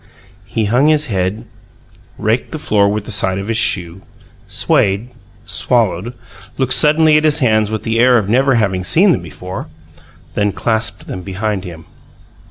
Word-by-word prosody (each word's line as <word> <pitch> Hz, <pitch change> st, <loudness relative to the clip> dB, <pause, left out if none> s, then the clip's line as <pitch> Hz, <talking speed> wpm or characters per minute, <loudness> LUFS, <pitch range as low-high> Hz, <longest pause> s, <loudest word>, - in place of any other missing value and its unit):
He 110 Hz, +3 st, -2 dB
hung 125 Hz, +8 st, +2 dB
his 155 Hz, -1 st, +3 dB
head, 95 Hz, +5 st, -2 dB, 0.7 s
raked 110 Hz, +3 st, -1 dB
the 155 Hz, -, -4 dB
floor 105 Hz, -9 st, +1 dB
with 105 Hz, 0 st, -3 dB
the -, -, -6 dB
side 95 Hz, -2 st, +1 dB
of 100 Hz, +2 st, -5 dB
his 115 Hz, -, 0 dB
shoe, 90 Hz, -2 st, -2 dB, 0.5 s
swayed, 100 Hz, +5 st, 0 dB, 0.4 s
swallowed, 115 Hz, -1 st, 0 dB, 0.4 s
looked 130 Hz, -2 st, +1 dB
suddenly 150 Hz, +4 st, +5 dB
at 155 Hz, -, +1 dB
his 155 Hz, -1 st, +4 dB
hands 110 Hz, -7 st, +1 dB
with 110 Hz, 0 st, -4 dB
the 115 Hz, 0 st, -1 dB
air 125 Hz, +1 st, +5 dB
of 105 Hz, -4 st, -1 dB
never 130 Hz, +4 st, +2 dB
having 95 Hz, -5 st, 0 dB
seen 180 Hz, -, +4 dB
them 90 Hz, -, 0 dB
before, 90 Hz, +3 st, -8 dB, 0.7 s
then 105 Hz, -1 st, 0 dB
clasped 110 Hz, -1 st, -1 dB
them 90 Hz, -, -7 dB
behind 95 Hz, +1 st, -4 dB
him. 80 Hz, -3 st, -10 dB
110 Hz, 165 wpm, -16 LUFS, 95-125 Hz, 0.7 s, suddenly